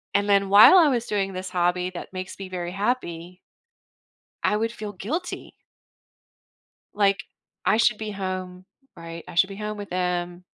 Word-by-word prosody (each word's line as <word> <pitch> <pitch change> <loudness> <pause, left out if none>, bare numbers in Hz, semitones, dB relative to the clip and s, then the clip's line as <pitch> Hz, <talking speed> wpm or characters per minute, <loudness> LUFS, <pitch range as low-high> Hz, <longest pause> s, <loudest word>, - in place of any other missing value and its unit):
And 200 +1 +2
then 200 -1 +3
while 210 - +9
I 320 -4 +6
was 240 -3 -1
doing 195 -2 -1
this 185 0 -5
hobby 180 0 0
that 180 +1 -9
makes 185 0 -6
me 195 -1 -7
very 175 -1 -5
happy 185 -5 -3 1.1
I 210 - +2
would 225 +1 -1
feel 210 -2 -6
guilty 300 - -5 1.4
like, 200 -1 +2 0.4
"I 215 - +4
should 220 -2 +3
be 215 -1 -5
home, 185 -1 -5 0.3
right? 165 0 -9
I - - -10
should 190 +3 +4
be 195 - -7
home 210 0 -5
with 205 -1 -7
him, 180 0 -2
195 Hz, 165 wpm, -24 LUFS, 180-210 Hz, 1.4 s, while